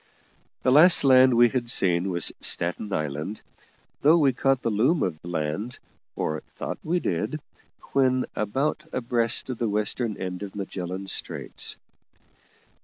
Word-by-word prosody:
The 130 - +3
last 160 +5 +6
land 130 -2 +6
we 120 0 +6
had 120 -2 -2
seen 90 -3 +2
was 85 -3 +2
Staten 90 +5 0
Island, 75 +5 -4 0.6
though 155 +4 +5
we 140 -5 +3
caught 135 0 +1
the 115 - 0
loom 130 +11 +2
of 80 -4 -3
land, 85 +7 -4 0.4
or 80 0 -2
thought - - -7
we 175 +3 0
did, 105 - -2 0.5
when 130 -2 +2
about 135 +9 -1
abreast 120 +1 -1
of 125 - -7
the 115 - 0
western 105 +2 -2
end 90 0 -5
of 100 -1 -7
Magellan 95 -1 -5
Straits. 95 - -3
115 Hz, 140 wpm, -25 LUFS, 90-130 Hz, 0.6 s, last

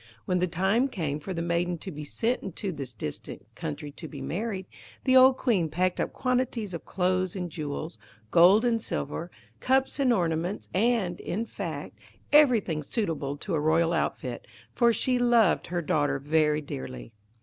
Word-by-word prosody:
When 180 0 +1
the 180 - +1
time 190 +9 +2
came 155 - -3
for 190 - -7
the 170 -2 -2
maiden 170 +1 0
to 190 - -7
be 150 -1 -7
sent 230 - -1
into 195 +1 -4
this 140 -6 -5
distant 75 -8 -6
country 145 - -5
to 160 +3 -9
be 145 - -9
married, 190 +6 -3 0.4
the 260 -1 +3
old 260 0 +7
Queen 195 - +1
packed 180 +4 0
up - - -1
quantities 250 -5 -1
of 170 - -6
clothes 185 0 0
and 180 -3 -4
jewels, 150 -3 -5 0.3
gold 190 +7 +6
and 230 -2 +2
silver, 165 -2 -3 0.3
cups 265 +2 +1
and 265 -3 +3
ornaments, 175 -1 -1
and, 205 -3 +1
in 220 +5 -3
fact, - - -6 0.3
everything 235 - +5
suitable 150 - -2
to 185 +5 -5
a 160 - +2
royal 165 +2 +2
outfit, 125 -6 -2 0.3
for 235 - +4
she 250 +3 +1
loved 235 -5 +3
her 175 0 -2
daughter 145 -1 +1
very 150 +1 +2
dearly. 135 -5 -7
180 Hz, 170 wpm, -27 LUFS, 155-225 Hz, 0.4 s, old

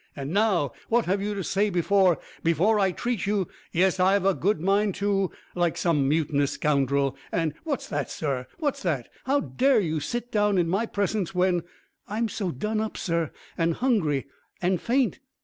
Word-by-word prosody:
And 140 0 -5
now, 195 - +2 0.2
what 235 0 +3
have 195 +2 0
you 205 +1 -2
to 195 - -3
say 205 +4 +1
before 185 0 +3 0.3
before 180 +7 +3
I 190 -2 +3
treat 240 +1 -2
you 200 -3 +1 0.2
yes, 185 +2 +2
I've 190 +1 +3
a 195 - +4
good 200 +1 0
mind 195 +3 +2
to 200 -2 +1 0.2
like 175 -2 0
some 150 -6 +2
mutinous 145 -2 +1
scoundrel, 140 -2 +1 0.2
and 165 -3 0
What's 290 -4 -2
that, 145 -1 -2
sir, 135 -5 -3
what's 295 -4 -1
that? 145 -10 -1 0.2
How 280 +2 +2
dare 265 -2 +2
you 160 -5 -1
sit 240 +11 -4
down 210 -2 +2
in 175 -2 +2
my 195 +7 0
presence, 200 -3 -1
when 180 -1 +2 0.2
" - - -45
"I'm 230 0 0
so 200 -3 -2
done 210 - -2
up, 220 - -4
sir, 170 -3 -1 0.3
and 165 0 +2
hungry 180 - +1 0.3
and 180 -1 +1
faint." 255 0 +1
190 Hz, 185 wpm, -26 LUFS, 160-210 Hz, 0.3 s, a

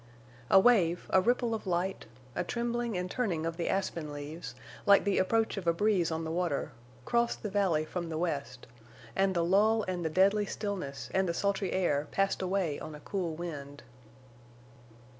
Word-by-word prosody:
A 195 - +8
wave, 190 -6 +4
a 190 - +5
ripple 240 +2 +1
of 220 -3 -4
light, 180 -2 -1 0.3
a - - 0
trembling 235 -2 -2
and 180 - -1
turning 180 -11 -1
of 165 0 -2
the 170 - -1
aspen 170 -5 -2
leaves, 145 +3 -7 0.3
like 200 0 +7
the 200 -1 +1
approach 220 +3 +1
of 185 -3 -5
a 170 - +5
breeze 190 -2 +2
on 160 0 -2
the 160 - -3
water, 170 -4 -1 0.3
crossed 235 0 0
the 210 - -3
valley 185 -7 +2
from 170 +1 -4
the 160 - -3
west; 140 -7 -3 0.5
and 195 -1 +2
the 170 -1 +2
lull 215 +5 +4
and 180 -2 -3
the 160 - 0
deadly 200 +5 +3
stillness 140 - -4
and 190 -1 +2
the 170 - -1
sultry 200 0 0
air 150 -6 +1
passed 195 0 0
away 185 -5 -1
on 155 -1 -7
a - - -10
cool 175 -1 -3
wind. 145 -4 -7
180 Hz, 180 wpm, -31 LUFS, 160-200 Hz, 0.5 s, A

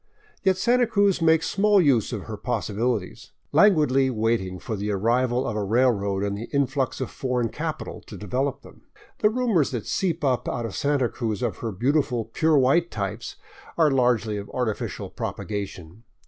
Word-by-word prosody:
Yet 190 -2 +2
Santa 240 +5 +3
Cruz 200 -4 +2
makes 160 0 +3
small 205 0 +3
use 135 - +3
of 110 -5 -4
her 110 - -6
possibilities, 110 -2 -3 0.2
languidly 150 -10 +4
waiting 110 -5 -1
for 110 +4 -5
the 105 +1 -3
arrival 120 +5 +1
of 110 - -3
a 105 - -1
railroad 100 -3 +1
and 100 0 -1
the 110 +3 -7
influx 135 -2 0
of 130 - -3
foreign 125 -3 -1
capital - - -5
to - - -9
develop 135 +6 -2
them. - - -16 0.4
The 210 - +4
rumors 220 - +1
that 120 -5 -4
seep 170 -4 -1
up 130 -3 +1
out 120 - -3
of 115 - -5
Santa 140 -3 +1
Cruz 110 -4 -3
of - - -1
her 115 - -4
beautiful 125 +2 0
pure 155 +7 +2
white 140 +6 +3
types 105 +2 -4 0.4
are 160 -3 +4
largely 120 -5 +2
of 100 0 -7
artificial 120 -4 -3
propagation. 100 -2 -5
125 Hz, 170 wpm, -24 LUFS, 110-150 Hz, 0.4 s, languidly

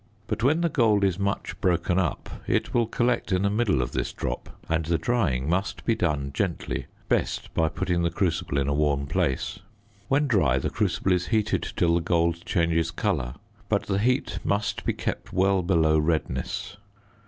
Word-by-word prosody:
But - - -3
when 150 +7 +3
the 170 - +3
gold 110 -8 +3
is 95 -1 +1
much 100 0 -2
broken 90 0 +2
up, 95 - -1 0.2
it - - 0
will 120 -2 +2
collect 120 -3 0
in 95 0 +2
the 100 - +2
middle 105 - +2
of - - -5
this - - -2
drop 60 -1 -4 0.2
and 80 0 +1
the 85 +1 +1
drying 85 - 0
must 95 +4 -1
be 115 - +3
done 75 -8 -1
gently; 95 +1 -2 0.2
best - - -1
by 80 -1 +2
putting 85 +3 -1
the 85 - +2
crucible 85 -6 -1
in 70 -1 +1
a 70 - +1
warm 70 -1 +1
place. 80 -2 -1 0.5
When 145 +2 +2
dry, 85 - +3
the 65 - -2
crucible 95 - 0
is 90 -1 +1
heated 110 -2 0
till 85 -1 +3
the 85 - +2
gold 85 0 +1
changes 85 -1 +1
colour, 85 - -1 0.3
but - - +2
the 95 -1 -1
heat 125 +4 +1
must 105 +1 -1
be - - +1
kept - - -4
well 95 0 +3
below 80 -3 +3
redness. 80 +5 -2
90 Hz, 185 wpm, -26 LUFS, 80-100 Hz, 0.5 s, when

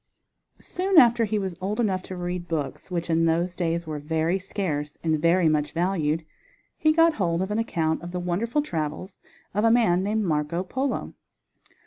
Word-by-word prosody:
Soon 375 0 -1
after 235 -4 +6
he 215 0 -1
was 190 -3 -3
old 205 +5 -2
enough 195 -5 +1
to 185 - -8
read 175 0 -4
books, 160 0 -4
which 170 -2 -2
in 165 0 +2
those 170 +2 +1
days 170 -1 -1
were 155 -1 -4
very 160 +4 0
scarce 155 -7 -3
and 160 -2 +1
very 170 +1 +4
much 150 -1 +1
valued, 165 -3 0 0.5
he 310 - +3
got 330 +1 +4
hold 170 - 0
of 190 +2 -2
an 210 - 0
account 160 -8 -1
of 175 - -7
the 180 0 -4
wonderful 210 +11 -1
travels 165 - -4 0.3
of 210 +1 0
a 230 - +5
man 225 -7 +3
named 210 +3 0
Marco 160 0 -1
Polo. 260 +9 -3
180 Hz, 180 wpm, -25 LUFS, 165-210 Hz, 0.5 s, after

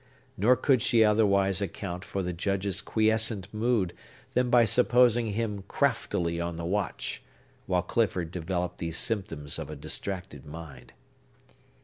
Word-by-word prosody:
Nor 115 +7 +4
could 130 -1 +2
she 115 0 +4
otherwise 100 -3 +3
account 90 -1 -4
for 100 -1 -3
the 90 0 -3
Judge's 100 +2 -1
quiescent 110 -2 +1
mood 110 -5 +1 0.4
than 125 0 +2
by 120 -1 +6
supposing 120 +1 +4
him 105 -2 -2
craftily 90 -11 0
on 85 0 -3
the 85 0 -5
watch, 100 +3 -2 0.5
while 90 -2 +1
Clifford 90 -5 0
developed 90 0 -3
these 80 -1 -2
symptoms 80 -10 -3
of - - -6
a - - -6
distracted 90 -8 -5
mind. 75 -5 -10
100 Hz, 135 wpm, -28 LUFS, 85-110 Hz, 0.5 s, by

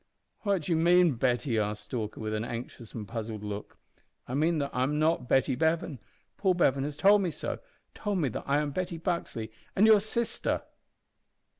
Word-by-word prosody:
"What 200 -5 0
do 175 - -3
you 165 - +3
mean, 175 -1 +5
Betty?" 120 0 +1
asked 105 0 -2
Stalker, 110 -4 -4
with 110 -1 -3
an 110 0 -1
anxious 115 -1 -7
and 105 -3 -5
puzzled 110 -1 -5
look. 105 0 -6 0.5
"I 125 - -5
mean 160 +4 +2
that 140 -1 -1
I 125 - 0
am 145 +3 +1
not 155 -5 +1
Betty 135 0 +3
Bevan. 160 -1 0 0.4
Paul 190 -3 +2
Bevan 140 -6 +2
has 145 0 -5
told 200 +3 +6
me 185 - 0
so 155 - -4 0.3
told 205 -2 -2
me 155 -6 +1
that - - -5
I 140 +1 +3
am 150 -1 0
Betty 180 +2 -3
Buxley, 165 - -3 0.2
and 205 - +5
your 220 -1 +8
sister!" 220 +3 -1
145 Hz, 190 wpm, -29 LUFS, 115-175 Hz, 0.5 s, your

